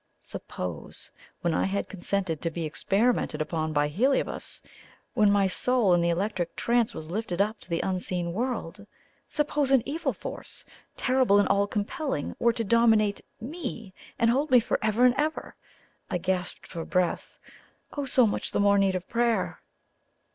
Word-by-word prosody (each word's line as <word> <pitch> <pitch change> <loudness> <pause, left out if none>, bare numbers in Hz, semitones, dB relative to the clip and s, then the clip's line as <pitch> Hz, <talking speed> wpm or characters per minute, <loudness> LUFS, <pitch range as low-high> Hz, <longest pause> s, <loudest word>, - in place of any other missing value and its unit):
Suppose, 90 -3 -7 0.3
when 170 -1 +1
I - - +1
had 200 +1 -1
consented 185 -3 -2
to 165 - -1
be 165 0 -4
experimented 205 +9 +1
upon 155 0 -1
by 145 -1 +2
Heliobas 250 - -1 0.5
when 210 -1 +4
my 200 -1 +4
soul 215 +1 +2
in 175 - +4
the 170 - +2
electric 180 0 -1
trance 235 -1 +1
was 160 +1 -7
lifted 195 -3 -3
up 210 +2 +1
to - - -15
the 170 -1 0
unseen 180 -2 -2
world 205 -4 -3 0.4
suppose 295 -2 0
an 265 -4 +4
evil 310 +4 -1
force, - - -8 0.3
terrible 255 -5 +3
and 205 - +4
all 200 0 +3
compelling, 215 +8 -3
were 235 - +4
to 230 0 -2
dominate 220 -2 +3 0.2
ME 235 - -6 0.2
and 230 0 +4
hold 280 +5 +1
me 255 -2 +7
forever 220 +1 +1
and 250 - +6
ever! 310 +1 -2 0.5
I - - 0
gasped 180 0 -2
for 165 -2 -6
breath! 180 0 -1 0.6
Oh, 285 -2 -3
so 255 -2 +5
much 210 - -1
the - - +1
more 200 0 +4
need 195 -1 +2
of 185 0 -4
prayer! 235 -1 0
205 Hz, 160 wpm, -27 LUFS, 180-240 Hz, 0.6 s, me